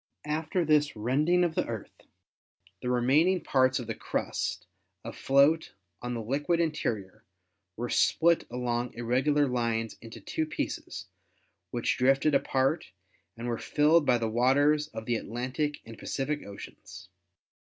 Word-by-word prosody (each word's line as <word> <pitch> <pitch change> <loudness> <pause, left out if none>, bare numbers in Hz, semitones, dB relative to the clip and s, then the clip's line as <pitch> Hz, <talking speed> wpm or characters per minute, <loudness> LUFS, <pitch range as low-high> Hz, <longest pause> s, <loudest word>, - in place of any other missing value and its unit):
After 160 +3 -1
this 150 -3 +3
rending 145 +11 +2
of 170 -2 0
the - - -1
Earth - - -7 0.8
the 125 - -3
remaining 140 +10 +3
parts 130 -4 +2
of 125 - -4
the - - -3
crust, - - -3 0.4
afloat 140 +4 +2 0.3
on 125 0 -3
the 115 - -4
liquid 145 +8 0
interior, 110 - -2 0.5
were 120 +2 -2
split 170 0 +3
along 120 0 -2
irregular 130 +5 +2
lines 115 -3 -1
into 115 0 -10
two 155 +9 -3
pieces, 155 - -4 0.6
which 120 +3 -1
drifted 135 +4 +3
apart 135 +5 +1 0.5
and 120 +1 -5
were 115 -1 -2
filled 150 +1 +3
by 125 - +5
the 115 -1 -1
waters 140 +6 +3
of 110 -7 -8
the 120 0 0
Atlantic 130 +7 -3
and 115 -1 -11
Pacific 145 +2 -2
Oceans. 100 -2 -11
130 Hz, 135 wpm, -29 LUFS, 120-150 Hz, 0.8 s, by